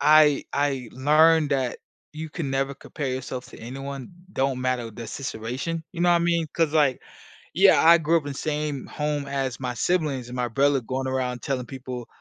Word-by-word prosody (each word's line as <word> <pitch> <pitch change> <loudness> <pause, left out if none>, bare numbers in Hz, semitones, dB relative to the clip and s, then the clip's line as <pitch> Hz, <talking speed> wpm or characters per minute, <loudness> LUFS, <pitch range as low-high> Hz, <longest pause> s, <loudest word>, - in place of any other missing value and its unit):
I 150 -1 +6
I 140 -4 0
learned 155 +3 +4
that 130 -3 0 0.3
you 160 +1 -6
can 150 -5 -4
never 135 +1 0
compare 140 +1 -5
yourself 130 -1 -4
to - - -13
anyone. 135 +2 -6 0.3
Don't 135 -1 0
matter 125 -3 -1
the 115 +2 -8
situation. 130 +7 -4
You 170 -2 -3
know 175 - +5
what 175 - +6
I - - +3
mean, 170 -1 +1
'cause, 160 -2 +1
like, 145 -5 +3 0.5
yeah, - - +6
I 170 +1 +9
grew 160 +2 +2
up 160 - -2
in - - -3
the - - -9
same 150 -3 -2
home 150 -1 -2
as 135 -2 -2
my 125 -2 -3
siblings 140 -4 0
and 125 - -7
my 125 -1 0
brother 140 +3 +3
going 130 +3 -3
around 125 -2 -2
telling 130 -3 -2
people 125 -3 -7
135 Hz, 195 wpm, -25 LUFS, 130-150 Hz, 0.5 s, I